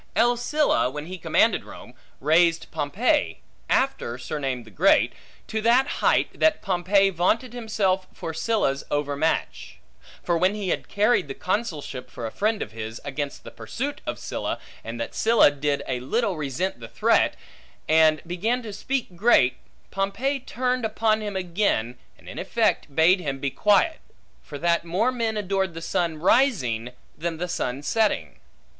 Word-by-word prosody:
L. 240 +2 +4
Sylla, 285 - +1
when 150 +3 -6
he 185 +2 -7
commanded - - +2
Rome, - - -12 0.3
raised 165 +3 +3
Pompey 195 - 0 0.3
(after 265 - 0
surnamed 130 -3 -4
the 110 - -15
Great) 95 - +3 0.3
to 220 - -3
that 240 +4 +4 0.2
height, - - +2
that 315 -1 +3
Pompey 195 +2 +2
vaunted 215 +8 0
himself 200 -6 0
for 165 - -6
Sylla's 160 -6 0
overmatch. 145 +2 -1 0.5
For 170 -1 +1
when 185 +4 +2
he 200 -3 -3
had - - -2
carried 210 -4 +2
the 135 - -6
consulship 155 - -3
for 115 - -7
a 110 - -4
friend 215 - 0
of - - -10
his, 110 0 -6
against 145 0 -4
the - - -10
pursuit 285 +4 -5
of 120 - -2
Sylla, - - -3 0.3
and 115 +1 -6
that 115 - -4
Sylla 225 -9 +5
did 145 0 -1
a 125 -1 -1
little 200 - 0
resent 155 +2 -3
thereat, 115 -1 +1 0.5
and 155 -1 +4
began 220 +9 -1
to 215 -3 -7
speak 245 -2 -3
great, 170 - +4 0.3
Pompey 200 +9 -1
turned 255 0 -2
upon 220 0 +1
him 205 -2 -4
again, 170 - -1 0.2
and - - -19
in - - -7
effect 140 - 0
bade 175 +4 +5
him 140 -6 -3
be 140 0 -2
quiet; 210 - +3 0.4
for 145 - -9
that 170 +2 +1
more 190 +9 +1
men 230 -3 -1
adored 190 -3 -1
the - - -4
sun 165 -1 -1
rising, 155 - +2 0.2
than 165 0 -3
the 180 +2 -3
sun 140 -6 -3
setting. 150 - 0
180 Hz, 160 wpm, -24 LUFS, 145-220 Hz, 0.5 s, Sylla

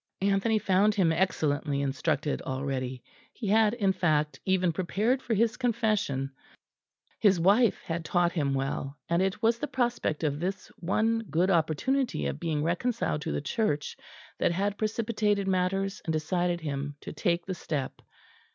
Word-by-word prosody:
Anthony 200 +3 +2
found 205 +1 +3
him 180 -5 +3
excellently 150 -5 0
instructed 140 +2 -1
already; 130 -2 -3 0.3
he 235 - -7
had, 215 +2 +4
in 200 -5 +2
fact, 155 -5 +1
even 185 -3 +2
prepared 210 +9 0
for 230 - -1
his 225 +2 +2
confession; 215 - 0 0.9
his 195 -5 +4
wife 205 +6 +4
had 165 0 -3
taught 175 +1 +2
him 140 -6 0
well; 135 +1 -3
and 170 +1 +2
it 190 +2 -1
was 230 +1 +3
the 295 - -2
prospect 240 - -1
of 145 -1 0
this 185 +2 -3
one 220 +6 +1
good 180 +4 +2
opportunity 170 - +1
of 70 0 -3
being 150 -3 -1
reconciled 175 0 0
to 160 - -3
the - - -1
Church 150 - -1 0.4
that - - +2
had 200 +3 -1
precipitated 215 -2 0
matters 195 +1 0
and 160 - -1
decided 175 +2 0
him 145 -1 -3
to - - -7
take 170 -3 0
the 190 - -3
step. 150 -6 -4
180 Hz, 155 wpm, -28 LUFS, 150-210 Hz, 0.9 s, had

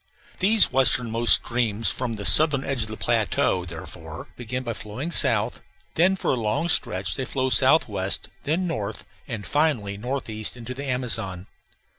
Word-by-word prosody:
These 210 +3 +6
westernmost 120 -3 +3
streams 115 -2 0
from 125 -2 -4
the 100 -2 -7
southern 150 -3 +5
edge 135 -4 -2
of 110 - 0
the 110 0 -8
plateau, 110 -5 -1
therefore, 80 -1 -10
begin 125 +2 -6
by 115 -2 -4
flowing 115 +11 -7
south; - - +2 0.3
then 185 +4 +2
for - - -2
a - - 0
long 115 +8 -2
stretch - - +1
they 135 - -4
flow 130 -1 -3
southwest; - - +1
then 165 +6 -2
north, 110 - -5 0.2
and 105 -3 -7
finally 135 -10 -1
northeast 115 -2 -3
into 120 +1 -8
the 140 +2 -8
Amazon. 110 -8 -2
120 Hz, 155 wpm, -23 LUFS, 110-140 Hz, 0.3 s, These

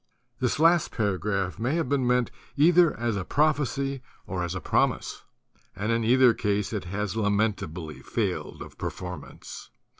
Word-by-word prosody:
This 125 -2 0
last 165 +2 +4
paragraph 100 -2 -1
may 125 +7 0
have 165 -5 0
been 135 -2 +1
meant 125 -1 +2 0.3
either 170 +3 +5
as 120 -2 0
a 95 - -2
prophecy 140 0 0 0.2
or 90 -1 -3
as 85 +1 -3
a - - -2
promise; - - 0 0.5
and 105 +4 -2
in 115 0 +1
either 125 +1 +5
case 105 -1 -1
it 100 -4 -3
has 100 +2 -3
lamentably 100 -8 -1
failed - - -3
of - - -14
per - - -1
formance. 90 -4 -9
110 Hz, 155 wpm, -27 LUFS, 95-135 Hz, 0.5 s, either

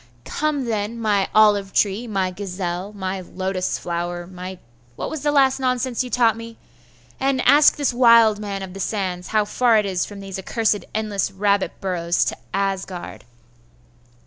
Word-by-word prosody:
'Come, 300 -3 -1
then, 220 0 -2
my 205 -3 +1
olive 205 -2 +4
tree, 210 +4 +1
my 190 -4 -1
gazelle, 180 0 -4
my 190 -2 -4
lotus 185 0 -3
flower, 175 0 -4
my 185 +1 -8 0.4
what - - -5
was 315 - -4
the 295 +1 +1
last 270 -2 +3
nonsense 255 -1 0
you 250 - -7
taught 235 -3 +3
me? 230 0 -9 0.6
and 270 0 +1
ask 295 +1 +6
this 285 -4 0
wild 230 -3 +6
man 200 -2 -4
of 185 -1 -8
the 195 - -8
sands 185 -3 -3
how 215 -1 +1
far 235 +2 +3
it 210 - +2
is 185 -2 -1
from 205 -1 -9
these 195 -1 -6
accursed 210 -1 0
endless 210 -3 -1
rabbit 200 0 +1
burrows 175 -2 0
to - - -3
Asgard. 190 - -3
205 Hz, 165 wpm, -22 LUFS, 190-230 Hz, 0.6 s, ask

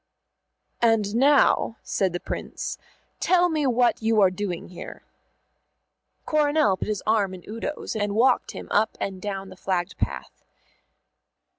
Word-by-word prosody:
"And 225 -3 +2
now," 270 -3 +4
said 190 -2 0
the 175 - -3
Prince, - - -5 0.4
"tell 355 -1 +3
me 305 -4 0
what 245 -1 +2
you 220 0 +2
are 190 -2 +5
doing 185 -2 -4
here." 180 - -9 1.2
Coronel 300 -7 +3
put - - -5
his 210 -2 -2
arm 205 -3 +1
in 180 - -12
Udo's 230 +7 -5
and 205 -1 -1
walked 250 +3 +3
him - - -8
up 215 +2 +2
and 190 -2 -4
down 195 -1 -4
the 185 - -11
flagged 180 -1 -2
path. - - -4
215 Hz, 140 wpm, -25 LUFS, 195-250 Hz, 1.2 s, are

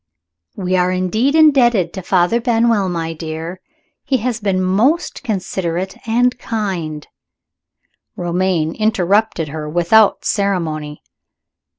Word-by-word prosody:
"We 185 -2 -1
are 180 0 +2
indeed 215 - 0
indebted 245 - +4
to 190 - -5
Father 185 +6 +1
Benwell, 230 -4 +2
my 165 -2 -3
dear. 165 +3 -6 0.4
He 270 -2 +1
has 240 0 -2
been 195 -3 0
most 220 - +1
considerate 185 -4 -3
and 245 +2 +1
kind 180 -11 -4 0.5
" - - -52
Romayne 175 -2 0
interrupted 205 -4 +1
her 150 0 -6
without 175 +6 +3
ceremony. 160 -7 -2
185 Hz, 110 wpm, -17 LUFS, 170-225 Hz, 0.5 s, indebted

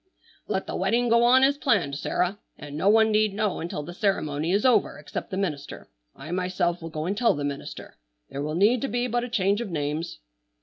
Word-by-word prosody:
"Let 190 - -1
the - - -5
wedding 230 +6 +1
go 235 +1 +4
on 255 +2 +6
as 280 +1 +3
planned, 180 - +1
Sarah, 180 +6 -1 0.2
and 145 0 -9
no 185 +6 +2
one 220 +1 +5
need 215 -1 +2
know 210 -2 -1
until 165 -3 -4
the 175 +4 -8
ceremony 165 -5 -1
is 200 +5 +1
over 235 -5 +3
except 145 - -6
the 190 - -4
minister. 150 - -4 0.2
I 155 +4 -9
myself 180 -1 -1
will 165 - -6
go 155 -1 -4
and 195 +4 -1
tell 235 +2 +3
the 145 - -4
minister. 140 - -6 0.3
There 140 - -6
will 150 +2 -3
need 215 +7 +3
to 275 - -1
be 245 -1 -1
but 240 0 -1
a 245 - -5
change 200 -1 +1
of 235 - -4
names." 155 +1 -3
190 Hz, 220 wpm, -25 LUFS, 155-225 Hz, 0.3 s, on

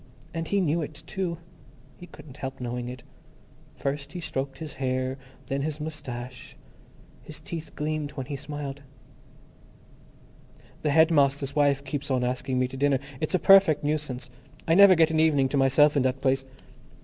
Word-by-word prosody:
And 165 -1 -3
he 200 -1 +1
knew 165 -1 +1
it, 150 0 -7
too. 180 -2 -3 0.6
He 175 - -12
couldn't 150 -4 -13
help 135 -2 -6
knowing 120 0 -4
it. 125 0 -9 0.7
First 140 +2 -4
he 180 - -5
stroked 135 -4 -4
his 155 +1 -7
hair, 130 0 -1 0.3
then 135 +1 -2
his 150 +1 -3
moustache; 130 -5 -7 0.6
his 155 - -10
teeth 165 -4 -7
gleamed 155 -1 -2
when 135 - -5
he 140 +2 -5
smiled. 145 0 -6 2.0
"The 150 - 0
headmaster's 145 -3 +3
wife 140 -2 +2
keeps 140 +1 -4
on 130 -2 +1
asking 130 +1 -1
me 125 0 +2
to 135 - -8
dinner. 140 0 +3 0.2
It's 155 +4 0
a - - +5
perfect 185 -4 +6
nuisance. 145 -5 -3 0.4
I 165 - +4
never 195 +1 +8
get 160 -1 +4
an 160 - +1
evening 145 -4 +3
to 140 - 0
myself 140 +3 +4
in 140 - +3
that 130 +1 0
place." 135 0 +1
145 Hz, 165 wpm, -26 LUFS, 135-155 Hz, 2.0 s, never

